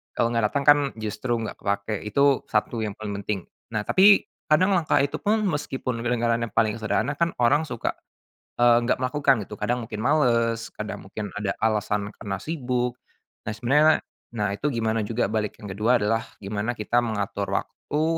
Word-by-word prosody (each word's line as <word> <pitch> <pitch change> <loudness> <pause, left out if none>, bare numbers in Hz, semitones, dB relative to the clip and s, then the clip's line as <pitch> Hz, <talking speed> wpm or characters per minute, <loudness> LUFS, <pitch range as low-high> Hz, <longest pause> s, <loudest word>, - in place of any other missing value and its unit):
kalau 115 0 +1
nggak 115 -2 +2
dateng 140 +5 -2
kan 145 +1 +7 0.2
justru 110 +2 -2
gak 110 - -6
kepake 100 +1 -2
itu 140 +4 +3
1 110 +2 0
yang 105 -2 -3
paling 100 -2 -5
penting 100 -1 -2 0.3
nah 105 -2 -2
tapi 195 - +5 0.2
kadang 185 +6 +4
langkah 165 -3 +1
itu 140 - -2
pun 215 +1 +1
meskipun 135 - -2
kedengarannya 115 -1 +1
paling 110 0 +2
sederhana 120 +5 -1
kan 170 0 +1
orang 145 +6 +3
suka, 120 -5 -2 0.7
eee, 120 -1 +5
nggak 120 - +1
melakukan 130 -3 +1
gitu 105 - -10
kadang 120 0 -1
mungkin 110 -2 -6
males, 115 -4 +2
kadang 110 -2 -6
mungkin 105 +2 -6
ada 105 -2 -1
alasan 105 -2 0
karena 95 -2 -5
sibuk, 125 -5 -2 0.5
nah - - -3
sebenarnya, 145 +8 +4 0.3
nah 105 -3 -1
itu 145 +5 -1
gimana 110 -2 0
juga 115 +1 -1
balik 105 -1 -1
yang 105 - -8
kedua 110 +6 +2
adalah 115 +2 +1 0.2
gimana 105 +4 -2
kita 120 +3 +1
mengatur 100 -3 -2
waktu, 150 +2 -4
115 Hz, 170 wpm, -25 LUFS, 105-130 Hz, 0.7 s, kan